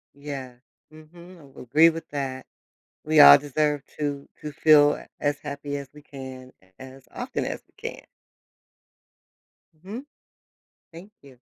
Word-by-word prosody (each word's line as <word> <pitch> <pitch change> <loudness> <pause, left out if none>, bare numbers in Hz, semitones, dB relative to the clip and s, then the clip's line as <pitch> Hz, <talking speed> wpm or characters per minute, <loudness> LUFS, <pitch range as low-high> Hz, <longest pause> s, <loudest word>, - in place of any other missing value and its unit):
Yeah. 140 -3 -8 0.4
Mhm, 170 +3 -15
I 150 - -16
would 135 -1 -13
agree 155 +7 +5
with 165 0 -7
that. 135 -2 -5 0.6
We 155 0 +4
all 145 0 +11
deserve 145 0 -1 0.2
to 145 -2 -3
to 150 - -7
feel 145 -1 +4 0.2
as 145 -1 -1
happy 145 0 -6
as 140 -1 -9
we 150 - -14
can 130 -2 -10 0.3
as 130 0 -13
often - - -4
as - - -5
we - - -36 0.2
can. - - -14 1.7
Mhm. 205 - -9 0.9
Thank 180 +6 -12
you. 135 -3 -17
145 Hz, 135 wpm, -25 LUFS, 135-155 Hz, 1.7 s, all